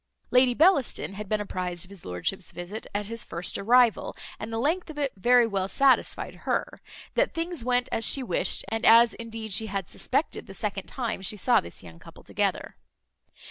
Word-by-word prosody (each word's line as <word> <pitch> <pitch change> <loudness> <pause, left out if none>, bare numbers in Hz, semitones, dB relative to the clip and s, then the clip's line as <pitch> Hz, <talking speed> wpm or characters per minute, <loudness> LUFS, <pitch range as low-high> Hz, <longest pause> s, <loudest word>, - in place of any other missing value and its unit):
Lady 250 -1 +4
Bellaston 300 - +2
had 205 0 -7
been 215 - +1
apprized 180 -3 -3
of 190 - -18
his 195 -4 -12
lordship's 90 - -3
visit 175 +5 -7
at 205 0 -3
his 230 +2 -6
first 170 +1 -5
arrival; 235 +2 +3 0.2
and 215 - -6
the 225 - -3
length 320 +9 0
of 310 - -9
it 280 -3 -1
very 240 +5 +4
well 195 -4 -1
satisfied 265 +6 +2
her, - - -1 0.3
that - - +1
things 330 -4 -3
went 250 0 +1
as 225 - -1
she 265 +5 +2
wished, - - +1
and 225 +2 -3
as 230 +1 +7
indeed 225 -2 -6
she 220 +4 +3
had 195 -3 -3
suspected - - -2
the - - -10
second - - -4
time 235 -7 -3
she 200 +2 -2
saw 245 +4 +3
this 85 - -10
young 85 -2 -13
couple - - -15
together. - - -2
225 Hz, 190 wpm, -26 LUFS, 195-250 Hz, 0.3 s, as